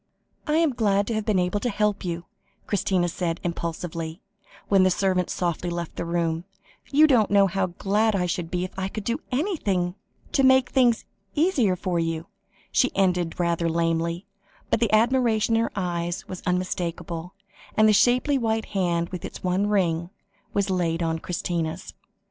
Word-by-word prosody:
"I 300 - +2
am 325 -4 +3
glad 205 -2 +1
I - - 0
have 215 -1 -2
been 210 -3 +2
able 180 +3 +1
to 245 - -1
help 210 -1 0
you," 170 -1 -4 0.4
Christina 190 -3 +1
said 170 0 -2
impulsively, 170 -1 -4 0.5
when 195 -1 +4
the 185 - +5
servant 185 -1 +1
softly 175 0 -2
left 170 -1 -4
the - - -3
room; 170 0 -1 0.4
"you 300 +2 +6
don't 245 -8 +4
know 200 -1 +5
how 195 0 0
glad 205 +4 +1
I 180 -2 +1
should 175 -1 -2
be 180 0 -1
if 185 - -4
I 190 - -1
could 210 +2 -6
do 235 +6 -1
anything 235 - 0 0.4
to 275 - +2
make 260 -1 +5
things 245 -4 +3 0.3
easier 290 - +2
for 180 -1 -1
you," 165 0 -2 0.5
she 255 - +3
ended 180 -4 +1
rather 170 -1 +1
lamely, 165 +2 0 0.5
but - - +3
the 230 -2 +1
admiration 230 -1 +3
in 225 - +3
her 230 - -1
eyes 175 -3 -2
was 185 - -7
unmistakable, 180 -1 -2 0.4
and 215 0 +6
the 215 - +5
shapely 255 +6 +3
white 225 -2 0
hand 170 -3 0
with 180 -2 -6
its - - -8
one 185 +3 +1
ring, 175 -5 +1 0.4
was 200 -1 0
laid 170 -2 0
on 165 0 -1
Christina's. 165 -2 -3
185 Hz, 170 wpm, -25 LUFS, 170-215 Hz, 0.5 s, you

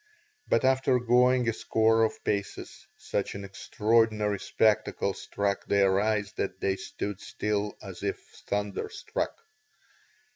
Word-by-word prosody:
But - - +2
after 130 0 +3
going 125 +1 +3
a 115 - +2
score 110 0 +2
of 110 - -1
paces 100 -1 -4
such - - -3
an 100 0 -6
extraordinary 105 +1 +1
spectacle 110 -2 +1
struck 100 +2 -2
their 100 -1 +3
eyes 105 0 0
that 95 - -3
they 95 -1 +1
stood 100 0 -5
still 105 -3 -2
as 95 -3 -9
if 100 -1 -1 0.3
thunderstruck. 105 - -3
105 Hz, 120 wpm, -28 LUFS, 100-115 Hz, 0.3 s, after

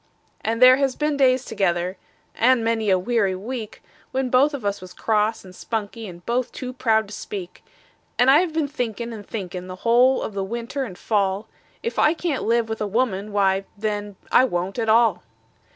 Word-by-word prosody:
And 230 +1 -1
there 255 +1 +9
has 275 -2 0
been 300 -1 0
days 260 -2 +3
together 180 -2 -1 0.4
and 245 0 +3
many 225 -2 0
a 190 - +5
weary 195 -1 +1
week 220 +2 -6 0.3
We 265 - 0
was 250 - -3
both 280 +4 +4
of 250 -7 -7
us 200 -1 -1
cross 215 0 0
and 185 -1 -13
spunky, 220 +1 -4
and 175 -1 -11
both 240 +1 -1
too 255 -1 -6
proud 220 -4 +1
to - - -9
speak; 190 -3 -7 0.5
And 250 +2 +5
I 290 - +7
have 355 -2 0
been 315 -2 0
thinkin' 235 -5 -4
and 210 -2 -8
thinkin', 185 -4 -5
the 185 - -7
whole 245 +3 +4
of 215 - -5
the 195 -1 -2
winter 235 +6 -4
and 185 -6 -9
fall, 200 -1 0 0.4
If 465 - -2
I 305 - +4
can't 320 -5 -2
live 235 +1 +2
kind 225 - -15
with 220 -1 -4
a 210 - 0
woman, 210 -2 -1
why, 195 -1 +2
then, 205 -1 -3 0.2
I - - +6
won't 190 -2 -2
at 225 -1 0
all. 225 -4 +4
225 Hz, 200 wpm, -23 LUFS, 200-255 Hz, 0.5 s, there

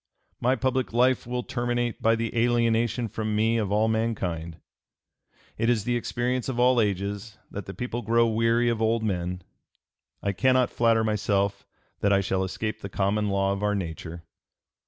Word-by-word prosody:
"My 125 +2 +2
public 130 -1 -1
life 125 0 +2
will 125 0 -2
terminate 120 -1 -2
by 115 0 +4
the 115 0 -3
alienation 120 0 +2
from 110 0 -3
me 110 +2 +2
of 100 -3 -2
all 105 +2 +3
mankind.... 95 -8 -2 1.0
It 115 +1 +2
is 115 -4 +2
the 120 +2 0
experience 125 +1 -1
of 125 -2 -3
all 125 -1 +5
ages 100 +1 -2
that 100 - -6
the 95 - -7
people 120 -1 -3
grow 115 +1 +3
weary 115 +1 +2
of 115 -2 0
old 110 0 +1
men. 90 -3 -2 0.8
I 100 - +1
cannot 130 +4 +2
flatter 115 -1 +3
myself 100 -2 0 0.3
that 100 - +2
I 100 - +5
shall 95 0 0
escape 110 +3 -4
the 100 - -6
common 100 +2 0
law 100 0 +1
of 100 - -4
our 105 0 +1
nature." 85 -2 -5
110 Hz, 170 wpm, -26 LUFS, 100-120 Hz, 1.0 s, all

